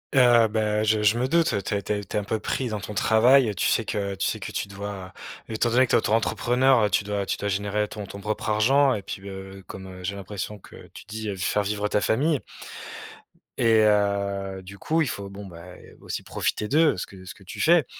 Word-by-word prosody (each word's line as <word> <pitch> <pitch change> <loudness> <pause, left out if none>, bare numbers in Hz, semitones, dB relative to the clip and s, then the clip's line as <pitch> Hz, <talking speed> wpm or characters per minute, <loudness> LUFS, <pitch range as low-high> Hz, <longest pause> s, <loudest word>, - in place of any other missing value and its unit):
Heu, 120 -3 +6
ben 105 0 0
je 110 0 +2
je 105 +2 +3
me 125 +2 +1
doute. 165 -8 +2
Tu - - -3
es 100 - -1
tu 100 - -2
es 105 0 -3
tu - - -7
es - - +3
un - - -4
peu 110 +2 -2
pris 125 +4 -2
dans 105 -1 -3
ton 105 +1 -7
travail, 120 +4 +5
heu, 105 - -4
tu - - +1
sais 115 - +2
que 100 -2 -2
tu 95 - -1
sais - - -2
que - - -6
tu - - -3
dois 100 -1 -7 0.4
étant 110 +2 0
donné 130 +3 +5
que - - -11
tu - - +5
es - - +7
autoentrepreneur, 120 +3 +2
heu, 105 - +2
tu - - +2
dois 100 -1 -2
tu - - -2
dois 100 - -2
générer 100 +2 -1
ton 105 0 -7
ton 100 +1 -9
propre 105 +3 -3
argent 135 +6 +4
et 105 - -3
puis, 95 0 -7
heu, 95 0 -9
comme, 95 -1 -9
heu, 90 -1 -10
j'ai 100 +3 -3
l'impression 100 +1 -6
que - - -15 0.2
tu - - -11
dis, 110 0 -5
heu, 100 - -3
faire 95 +3 0
vivre 105 +1 -1
ta 105 - +1
famille 140 +7 +1 1.2
et 110 -1 +4
heu, 100 -2 +1
du 100 +2 -11
coup, 160 +1 +1
il - - -2
faut 100 -4 -5
bon, 100 +1 -9
bah 85 -2 -11 0.4
aussi - - -5
profiter 105 - -2
d'eux. 155 - +3
Ce - - -3
que 95 -1 -14
ce 95 - -9
que 100 - -18
tu 90 - -7
fais. 165 -3 +5
105 Hz, 250 wpm, -25 LUFS, 100-115 Hz, 1.2 s, es